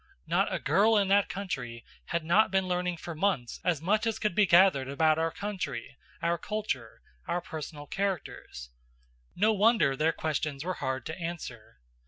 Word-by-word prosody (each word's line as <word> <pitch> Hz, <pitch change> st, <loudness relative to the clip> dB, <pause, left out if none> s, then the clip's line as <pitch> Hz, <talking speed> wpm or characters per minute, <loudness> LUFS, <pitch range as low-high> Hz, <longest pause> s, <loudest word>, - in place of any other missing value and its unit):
Not -, -, +1 dB
a -, -, 0 dB
girl 205 Hz, +10 st, +3 dB
in 200 Hz, -2 st, +2 dB
that 200 Hz, 0 st, +4 dB
country 125 Hz, -, -5 dB, 0.2 s
had 170 Hz, -1 st, -2 dB
not 185 Hz, +7 st, +4 dB
been 190 Hz, -1 st, +1 dB
learning 180 Hz, -1 st, -1 dB
for 170 Hz, +1 st, -7 dB
months 155 Hz, -8 st, -1 dB
as 165 Hz, -4 st, 0 dB
much 215 Hz, +5 st, +2 dB
as 225 Hz, -, 0 dB
could 210 Hz, -, -1 dB
be 205 Hz, +2 st, +4 dB
gathered 170 Hz, -7 st, +5 dB
about 155 Hz, +2 st, +3 dB
our 165 Hz, 0 st, +1 dB
country, 165 Hz, -, -5 dB, 0.3 s
our 170 Hz, 0 st, +1 dB
culture, 165 Hz, -, -4 dB, 0.2 s
our 175 Hz, -, 0 dB
personal 155 Hz, -3 st, -7 dB
characters. 175 Hz, -, -4 dB, 0.6 s
No 215 Hz, +3 st, +3 dB
wonder 210 Hz, -, +4 dB
their 155 Hz, +4 st, +2 dB
questions 150 Hz, -2 st, -3 dB
were 185 Hz, -, -1 dB
hard 130 Hz, -2 st, -2 dB
to 160 Hz, +3 st, -6 dB
answer. 125 Hz, -, -7 dB
170 Hz, 170 wpm, -29 LUFS, 140-195 Hz, 0.6 s, gathered